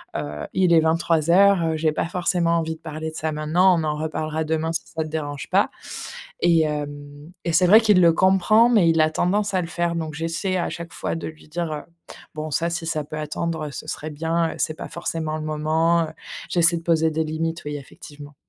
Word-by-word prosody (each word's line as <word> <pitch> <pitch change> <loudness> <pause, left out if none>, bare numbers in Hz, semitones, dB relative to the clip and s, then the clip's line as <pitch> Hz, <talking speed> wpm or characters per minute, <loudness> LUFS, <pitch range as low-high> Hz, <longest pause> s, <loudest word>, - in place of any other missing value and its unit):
heu, 75 0 -4
il 180 -2 +3
est 165 - +7
23:00 160 0 +1
heures, 195 0 +5
heu, 160 -1 0
j'ai 155 0 +1
pas 155 - -2
forcément 175 -1 +1
envie 160 -1 -2
de 160 - -21
parler 155 0 -5
de - - -13
ça 160 0 -2
maintenant. 170 +4 +3
On - - -2
en 150 -1 -1
reparlera 155 0 -3
demain 160 +1 -1
si 160 - 0
ça 160 - -4
te - - -7
dérange 145 -3 -5
pas», - - +3 0.7
et 170 -2 +4
hem, 145 0 -5
et 170 - 0
c'est 180 +3 +5
vrai 215 +5 +8
qu'il 210 -4 +4
le 170 -1 +6
comprend 195 +6 +4
mais 210 -8 +4
il 165 -1 +3
a 155 - +4
tendance 200 +6 0
à 185 - +2
le - - -4
faire, 170 0 -1
donc 160 -2 -4
j'essaie 165 +4 -2
à 175 - -1
chaque 170 0 -7
fois - - -3
de 165 - -5
lui 155 -1 -12
dire, 170 0 -3
heu: 150 -1 -4 0.5
«Bon, 155 0 -5
ça, 170 +4 0
si 170 0 -3
ça 155 -2 -1
peut 155 +1 -7
attendre, 155 +1 -3
heu, - - -7
ce - - -8
serait 155 - -5
bien, 165 +2 -1
heu, - - -10
c'est 155 - 0
pas - - -6
forcément 160 -2 -3
le 155 - -5
moment, 160 +2 +1
heu». - - -8 0.4
J'essaie 170 -1 +4
de 165 - -6
poser 160 -1 +2
des 160 +1 0
limites, 160 +2 -3
oui, 150 0 -4
effectivement. 145 +1 -12
160 Hz, 235 wpm, -23 LUFS, 155-170 Hz, 0.7 s, vrai